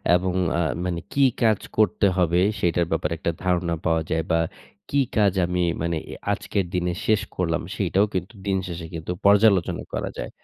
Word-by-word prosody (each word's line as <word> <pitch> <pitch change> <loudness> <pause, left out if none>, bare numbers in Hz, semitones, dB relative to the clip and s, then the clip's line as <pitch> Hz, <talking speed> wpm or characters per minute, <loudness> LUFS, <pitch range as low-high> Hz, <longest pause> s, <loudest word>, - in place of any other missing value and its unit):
এবং 90 0 0 0.3
আ - - +2 0.2
মানে 85 -2 -1
কি 140 - +3 0.2
কাজ 110 -4 +4 0.2
করতে 105 -1 +3
হবে, 90 0 +3 0.2
সেইটার 85 0 +2
ব্যাপারে 80 0 0
একটা 85 - -1
ধারণা 90 -2 +1
পাওয়া 80 -1 +2
যায় 80 0 +1
বা 80 - +3 0.5
কি 140 - +2 0.2
কাজ 100 -3 +4
আমি 90 0 -1 0.2
মানে 85 0 0
এ - - -6 0.2
আজকের 95 -3 -2
দিনে 90 -1 0
শেষ 110 -2 +3
করলাম, 85 -2 0
সেইটাও 100 +1 +2
কিন্তু 90 +5 -3
দিনশেষে 95 -3 -2
কিন্তু 80 +1 -5
পর্যালোচনা 100 -2 +4
করা - - -2
যায়। - - -4
90 Hz, 175 wpm, -24 LUFS, 85-100 Hz, 0.5 s, কাজ